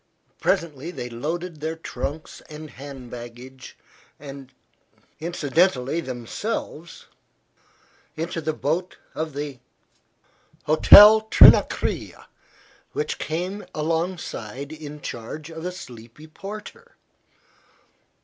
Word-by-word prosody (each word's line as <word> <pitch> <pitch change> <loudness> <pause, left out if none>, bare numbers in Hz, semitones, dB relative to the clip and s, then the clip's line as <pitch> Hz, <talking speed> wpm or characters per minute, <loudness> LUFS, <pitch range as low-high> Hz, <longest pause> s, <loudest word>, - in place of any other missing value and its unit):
Presently 155 -1 -1
they 180 - -6
had 120 -1 -8
loaded 165 +6 -4
their 160 +2 -3
trunks 155 -1 -6
and 155 0 -9
hand 135 -2 -10
baggage, 120 +2 -10 0.4
and 135 -2 -10 0.7
incidentally 160 -2 +1
themselves, 155 - -5 1.1
into 165 +1 -3
the 155 0 -1
boat 160 +4 -2 0.2
of 160 -2 -4
the 145 -3 -5 1.0
Hotel 210 +7 +9
Trinacria - - +5 0.7
which 445 - -2
came 180 +6 -3
alongside 155 - -3
in 150 -1 -9
charge 150 +8 -7
of 160 +1 -8
a 180 - -2
sleepy 125 -5 -12
porter. 210 - -10
155 Hz, 90 wpm, -24 LUFS, 135-170 Hz, 1.1 s, Hotel